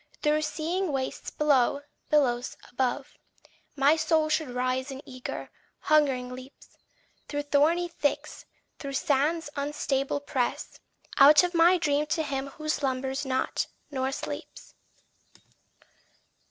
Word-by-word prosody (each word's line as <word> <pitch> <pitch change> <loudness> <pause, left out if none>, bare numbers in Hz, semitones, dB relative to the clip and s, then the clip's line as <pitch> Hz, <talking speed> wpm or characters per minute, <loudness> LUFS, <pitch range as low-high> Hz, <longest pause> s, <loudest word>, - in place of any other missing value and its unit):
Through 305 0 +3
seething 335 +3 -2
wastes 265 -1 -3
below, 285 -2 +2 0.3
billows 250 -5 +1
above, 260 +2 -2 0.6
My 285 +2 +4
soul 315 -1 +2
should 310 -2 0
rise 255 +2 -1
in 270 +1 -8
eager, 255 -1 -7 0.3
hungering 275 -5 +2
leaps; 255 +2 -12 0.6
Through 290 0 -3
thorny 300 +5 +2
thicks, 295 -4 -3 0.3
through 275 -1 -6
sands 290 +3 +1
unstable 280 -1 -1
press 260 -3 -2 0.4
Out 295 +4 +9
of 355 0 -1
my 340 +2 +5
dream 300 -3 +1
to 315 +1 0
him 275 -2 -3
who 310 +2 -9
slumbers 270 -1 -1
not 260 0 -1 0.2
nor 265 -1 -1
sleeps. - - -7
285 Hz, 115 wpm, -27 LUFS, 265-305 Hz, 0.6 s, Out